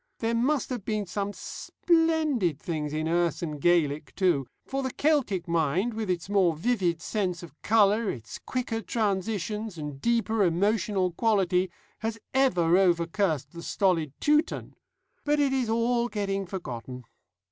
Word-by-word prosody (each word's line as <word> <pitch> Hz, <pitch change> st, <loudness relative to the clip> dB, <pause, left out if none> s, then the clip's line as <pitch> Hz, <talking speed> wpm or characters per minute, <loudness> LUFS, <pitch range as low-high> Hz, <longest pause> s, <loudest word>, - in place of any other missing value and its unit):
There 225 Hz, 0 st, -1 dB
must 260 Hz, +4 st, +1 dB
have 245 Hz, -5 st, -3 dB
been 215 Hz, -1 st, -1 dB
some 200 Hz, +2 st, -3 dB
splendid 310 Hz, -, 0 dB
things 155 Hz, -3 st, -3 dB
in 155 Hz, +1 st, -2 dB
Erse 170 Hz, 0 st, +1 dB
and 150 Hz, -3 st, -4 dB
Gaelic 155 Hz, -4 st, +1 dB
too; 170 Hz, -9 st, +2 dB, 0.2 s
for 270 Hz, 0 st, -2 dB
the 260 Hz, -, -1 dB
Celtic 260 Hz, -, +1 dB
mind, 170 Hz, +7 st, +1 dB
with 215 Hz, -2 st, -4 dB
its 175 Hz, -2 st, -1 dB
more 190 Hz, -5 st, +3 dB
vivid 175 Hz, -3 st, 0 dB
sense 185 Hz, -5 st, -2 dB
of 165 Hz, -5 st, -10 dB
colour, 215 Hz, 0 st, +3 dB
its 115 Hz, -3 st, -6 dB
quicker 245 Hz, -3 st, -3 dB
transitions, 210 Hz, -1 st, -2 dB
and 145 Hz, -3 st, -6 dB
deeper 230 Hz, -2 st, +1 dB
emotional 195 Hz, +1 st, +1 dB
quality, 190 Hz, -2 st, +2 dB, 0.3 s
has 225 Hz, 0 st, -3 dB, 0.2 s
ever 180 Hz, -10 st, +3 dB
over 175 Hz, -3 st, +3 dB
cursed 165 Hz, -5 st, -1 dB
the 170 Hz, -1 st, -9 dB
stolid 170 Hz, -5 st, +1 dB
Teuton. 300 Hz, +1 st, +1 dB, 0.5 s
But 295 Hz, 0 st, +1 dB
it 280 Hz, -2 st, +2 dB
is 255 Hz, -4 st, 0 dB
all 235 Hz, +1 st, +1 dB
getting 195 Hz, -3 st, -2 dB
forgotten. 125 Hz, -, -6 dB
195 Hz, 145 wpm, -27 LUFS, 170-230 Hz, 0.5 s, more